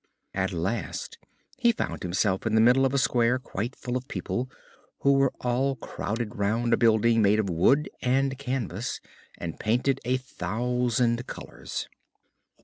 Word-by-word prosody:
At - - 0
last - - -3 0.4
he 235 -2 +5
found 225 - -3
himself 95 +3 0
in 110 - +1
the - - +5
middle 125 +3 +5
of 130 - -5
a - - +3
square 125 -2 +3
quite 120 -1 -4
full 125 0 -4
of 130 +1 -3
people, 125 +2 -3 0.5
who 140 - +5
were 135 -1 +3
all 130 +3 +1
crowded 115 -2 -4
round 115 +4 +1
a - - +5
building 115 0 +4
made 105 +1 +4
of 100 -4 0
wood 135 - +3
and 135 +2 +2
canvas, 125 -5 -3 0.4
and 85 -2 -6
painted 125 +5 +1
a 125 +2 +1
thousand 120 +1 -1
colors. - - -6
120 Hz, 150 wpm, -27 LUFS, 110-130 Hz, 0.5 s, he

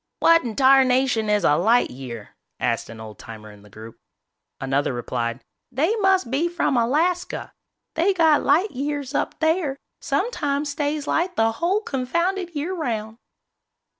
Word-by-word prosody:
"What 330 0 +5
in 230 -3 -5
tarnation 260 -4 +3
is 210 -2 +2
a 145 - +4
light 225 +7 +3
year?" 120 -4 -9 0.2
asked - - -1
an 115 -1 -10
old 110 -2 -10
timer 110 -1 -10
in 105 -1 -16
the 105 - -18
group. 110 +3 -12 0.6
Another 135 0 -1
replied, 120 0 -3 0.3
"They 320 - +1
must 385 - +2
be 310 +6 +1
from 335 -5 0
Alaska. 320 +10 0 0.4
They 340 +5 +2
got 320 -4 +4
light 340 +9 +2
years 285 0 -4
up - - -2
there, 315 -3 0 0.2
sometimes 290 - -1
stays 290 0 -2
light 355 +4 0
the 225 0 +2
whole 350 - 0
confounded 340 - -2
year 310 +6 -2
'round." 225 -9 -4
275 Hz, 150 wpm, -23 LUFS, 210-330 Hz, 0.6 s, What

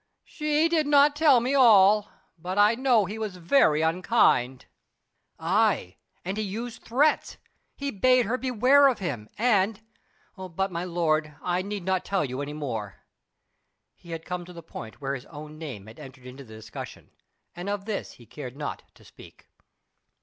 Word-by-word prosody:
"She 305 +1 0
did 320 -3 +1
not 290 0 +5
tell 295 -4 +5
me 250 +4 -1
all, 210 -5 +5 0.3
but 180 +3 -6
I 205 +2 +5
know 245 -4 +2
he 210 +5 -6
was 210 -4 -4
very 165 - +3
unkind." 160 - +2 0.7
"Aye, 185 - +1 0.3
and 190 +3 -3
he 215 - -1
used 225 +4 -6
threats. 290 +6 +1 0.4
He 280 0 -4
bade 255 +4 +3
her 230 - -1
beware 255 +2 +4
of 255 -4 +1
him; 130 - -5
and 210 -3 +2 0.6
but, 190 0 -4
my 170 0 -3
lord, 155 -4 -1
I 180 0 0
need 200 0 -5
not 190 0 0
tell 195 -5 -1
you 130 +1 -5
any 145 +1 -5
more." 115 -9 -6 0.9
He 170 - -18
had 165 -1 -6
come 180 -1 -4
to 180 - -12
the 170 -1 -11
point 115 -5 -10
where 135 0 -2
his 135 -2 -6
own 150 0 -11
name 130 -11 -7
had 110 +1 -14
entered 130 -1 -12
into 130 +2 -10
the 110 -3 -13
discussion, 110 +1 -10 0.4
and 175 +3 -6
of 200 -1 -3
this 215 -2 -4
he 120 - -17
cared 130 0 -9
not 145 - -5
to - - -20
speak. - - -17
185 Hz, 170 wpm, -26 LUFS, 150-230 Hz, 0.9 s, not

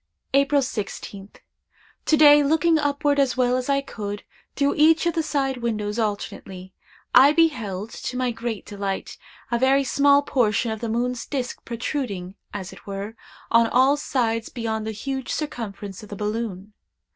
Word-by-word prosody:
"April 280 +1 +4
16th. 200 -3 -6 0.7
To 310 - +4
day, 295 -1 +8
looking 320 +3 +3
upward 285 0 +1
as 270 -2 +2
well 250 -1 +3
as 255 +1 -2
I 275 0 +2
could, 205 -6 -6 0.3
through 280 0 +2
each 315 +2 +4
of 340 - +2
the 325 - +1
side 275 -4 -1
windows 215 -2 -2
alternately, 195 -3 -4 0.4
I 275 +3 +8
beheld, 230 - 0
to 250 - -5
my 255 -1 0
great 230 -2 -5
delight, 200 -1 -4 0.3
a 235 - +1
very 270 +2 +4
small 280 +1 +4
portion 230 -4 +1
of 220 - -4
the 230 - -3
moon's 245 +2 -2
disk 260 -3 -4
protruding, 230 -6 -4 0.2
as 190 -2 -6
it - - -16
were, 200 +3 -5 0.4
on 230 0 +5
all 260 +4 +4
sides 230 -6 -1
beyond 220 -3 -3
the - - -2
huge 265 +4 -4
circumference 205 - -5
of 210 - -12
the 205 - -6
balloon. 210 -1 -4
240 Hz, 160 wpm, -24 LUFS, 210-280 Hz, 0.7 s, day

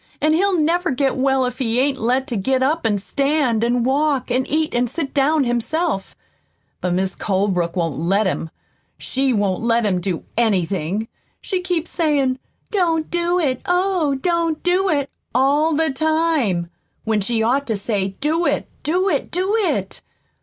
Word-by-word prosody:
"An' 310 +1 +2
he'll 380 +3 +2
never 345 +3 +1
get 270 0 0
well 265 0 +2
if 250 +1 -4
he 235 -2 +1
ain't 270 0 +1
let 250 +4 +1
to 245 - -4
get 260 +6 +1
up 310 +3 +1
an' 205 -2 +1
stand 275 +1 0
an' 240 0 +1
walk 275 0 +1
an' 255 +1 +1
eat 310 +2 0
an' 245 +1 +1
sit 280 +2 -4
down 295 +1 +3
himself. 240 - -1 0.7
But 180 -1 0
Mis' 190 0 0
Colebrook 185 -4 -1
won't 165 -5 -1
let 195 +6 +1
him. 170 -3 -2 0.5
She 270 0 -1
won't 205 -5 0
let 230 0 +2
him 185 -3 +1
do 175 -2 -3
anything. 195 -2 0 0.3
She 375 -2 -2
keeps 355 -3 -2
sayin', 280 -6 +1 0.3
'Don't 335 -6 0
do 345 +1 +1
it, 270 -8 0
oh, 355 -5 +1
don't 335 +2 -1
do 365 +2 +2
it,' 285 -4 0 0.2
all 290 +5 +3
the 320 0 +1
time, 295 - +1 0.3
when 220 -2 0
she 225 +2 0
ought 270 +5 +1
to 225 - 0
say, 195 -2 -2
'Do 320 +4 +1
it, - - 0
do 360 +5 +1
it, - - 0
do 375 +4 0
it!' 435 -4 -1
265 Hz, 170 wpm, -20 LUFS, 220-320 Hz, 0.7 s, down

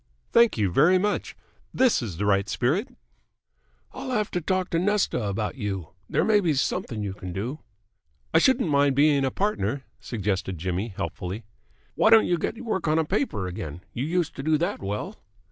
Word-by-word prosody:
"Thank 235 - +5
you 100 -4 +1
very 160 - +5
much. 205 +2 -1 0.3
This 255 - +3
is 100 -9 -5
the 105 - -1
right 100 0 +2
spirit." 155 - 0 1.0
"I'll 265 0 -7
have 215 -5 0
to 180 - -1
talk 185 +2 -1
to 165 - +2
Nesta 200 -7 +1
about 105 +6 -2
you. 95 - -4 0.2
There - - +2
may 215 -1 +4
be 170 -7 +1
something 115 -4 -1
you 100 -2 -3
can 90 -2 -7
do." 115 - -4 0.7
"I 160 - +6
shouldn't 250 - +3
mind 140 -1 +3
being 145 -1 +4
a 135 - +2
partner," 140 - -1 0.2
suggested 95 -4 -2
Jimmy 90 +5 -2
helpfully. 95 +1 -5 0.5
"Why 220 - +3
don't 225 -1 +7
you 175 -1 +1
get 225 - -3
work 190 -7 -1
on 155 +1 +3
a 160 - +2
paper 180 - -1
again? 85 -2 -6
You 120 - -2
used 170 0 -1
to - - -3
do 155 +2 +2
that 175 +6 -2
well." 100 +2 -4
140 Hz, 185 wpm, -25 LUFS, -, 1.0 s, don't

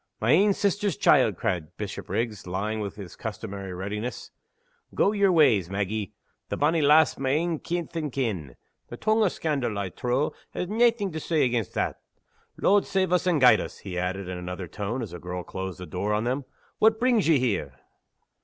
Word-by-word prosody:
"My 115 - +2
ain 200 +6 +5
sister's 200 0 0
child!" 130 - +4
cried 90 -9 -3
Bishopriggs, 110 -6 -4
lying 105 +4 -2
with 100 -2 -4
his 95 -5 -9
customary 100 -3 -6
readiness. 105 +6 -5 0.6
"Go 200 - +3
yer 200 -2 +3
ways, 115 - +4
Maggie. 100 0 -3 0.3
The - - -2
bonny 160 +3 +2
lassie's 150 +1 +5
my 135 -1 0
ain 160 +3 0
kith 175 -1 -4
and 155 -3 -2
kin. 100 - -3 0.3
The - - -8
tongue 220 +1 +2
o' 215 - +5
scandal, 140 - -2
I 100 -2 -2
trow, 125 +9 -1 0.2
has 180 - -2
naething 225 -2 +2
to 160 - -4
say 155 0 +1
against 120 -4 -1
that. - - -1 0.6
Lord 200 +1 +3
save 190 -2 +1
us 180 0 +2
and 170 -4 +3
guide 125 -4 +6
us!" - - -7
he 95 -3 -7
added 90 +1 -2
In 90 -1 -5
another 90 +1 -5
tone, 105 +7 -4
as 105 - -7
the 90 - -7
girl 90 +1 -5
closed 95 0 -6
the 90 - -6
door 100 +4 -1
on 105 - 0
them, 130 +3 -1 0.3
"what 220 0 +4
brings 245 -6 +3
ye 160 -3 +5
here?" 85 - -1
120 Hz, 190 wpm, -26 LUFS, -, 0.6 s, guide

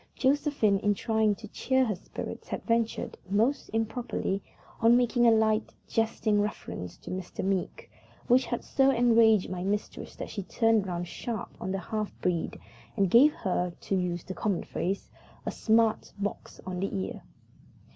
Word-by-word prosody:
Josephine, 270 -7 +2
in 205 0 +2
trying 220 0 +1
to 215 - -10
cheer 260 +3 +1
her 220 - 0
spirits, 180 - -7
had - - -4
ventured, 230 -1 -1
most 230 +8 +1
improperly, 225 -3 -2 0.4
on 230 +2 +6
making 245 -1 +3
a - - +7
light, 220 -1 +2
jesting 220 -2 +1
reference 90 - -5
to - - -9
Mr. 185 0 -4
Meeke, 195 -2 -2 0.4
which 250 0 +4
had 240 - -2
so 270 0 +3
enraged 230 -6 +4
my 180 -1 -3
mistress 205 +2 -3
that - - -6
she 200 - -4
turned 225 +1 +2
round 175 -1 -3
sharp 220 +5 -5
on 185 - -3
the 195 - -1
half 210 +3 -3
breed 175 -2 -1 0.4
and 195 -3 +2
gave 275 +6 +8
her 180 -3 -1
to 195 - -1
use 175 -2 -1
the 185 - -6
common 195 -2 -1
phrase 190 +3 -3 0.3
a - - -1
smart 225 0 +2
box 205 0 -4
on 185 -1 -4
the 195 - -1
ear. 190 - -5
215 Hz, 165 wpm, -29 LUFS, 190-230 Hz, 0.4 s, gave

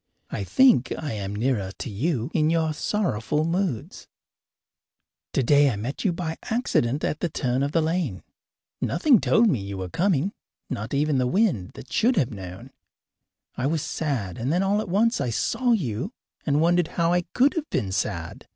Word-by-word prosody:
I 100 - -3
think 245 - +4
I 150 -6 -4
am 100 -1 -4
nearer 105 -4 0
to - - -5
you 130 - -1
in 155 -2 +2
your 160 -1 +1
sorrowful 155 - -1
moods. 170 - -2 1.2
Today 140 +2 +4
I 120 - -1
met 115 +7 -4
you 195 - +2
by 165 -2 -4
accident 150 - 0
at 150 - -1
the 175 - -1
turn 130 -3 -1
of 140 +1 0
the 165 0 +2
lane. 160 - -1 0.6
Nothing 240 - +3
told 230 +1 +4
me 130 - +1
that 100 - -7
you 100 -1 -5
were 95 -1 -4
coming 180 - +1 0.4
not 110 +6 -3
even 145 -1 +2
the 125 - +1
wind, 160 - +1
that 130 - -11
should 245 +3 +3
have 140 - +1
known. 95 -3 -9 0.8
I 130 - -1
was 155 0 0
sad, 125 - -3
and 125 +5 -1
then 180 +4 +2
all 200 +2 +2
at 210 - -6
once 220 - +2
I 125 - 0
saw 245 - 0
you, 135 - 0 0.4
and 145 0 +3
wondered 175 0 +3
how 170 0 +3
I 175 - +3
could 270 +3 +4
have 325 -4 -3
been 100 -7 -1
sad. - - -3
150 Hz, 185 wpm, -25 LUFS, 120-180 Hz, 1.2 s, think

